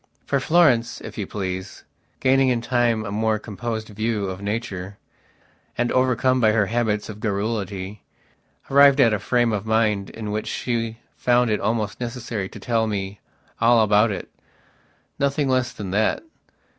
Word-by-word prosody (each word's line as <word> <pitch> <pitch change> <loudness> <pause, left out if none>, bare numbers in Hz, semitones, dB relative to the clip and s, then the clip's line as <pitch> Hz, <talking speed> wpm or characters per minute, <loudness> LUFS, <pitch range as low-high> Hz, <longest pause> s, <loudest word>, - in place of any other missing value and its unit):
For 140 - +1
Florence, 135 -7 +3
if - - -9
you 100 - -3
please, 95 -1 -5 0.4
gaining 135 0 +4
in 125 -2 +1
time 120 -2 +1
a 100 - -5
more 110 +1 +1
composed 110 +1 -5
view 110 0 -2
of 95 +1 -8
nature, 100 -2 -4 0.8
and 120 0 +1
overcome 130 0 +2
by 110 -2 +4
her 105 -2 +3
habits 110 -1 -1
of 105 -1 -8
garrulity, 100 -2 -3 0.7
arrived 140 0 +7
at 115 -5 +5
a 105 - 0
frame 120 +1 +1
of 105 +1 -3
mind 110 -3 +1
in 105 -2 -6
which 110 +1 -3
she 115 -2 -2 0.2
found 120 -1 +2
it 105 - +1
almost 105 -2 -1
necessary 120 -5 -4
to - - -11
tell 115 -2 0
me 100 -1 -4 0.4
all 115 0 +5
about 105 +2 +4
itnothing 140 +7 -5
less 130 -2 +1
than 105 -7 -6
that. 110 - +1
110 Hz, 155 wpm, -23 LUFS, 105-120 Hz, 0.8 s, arrived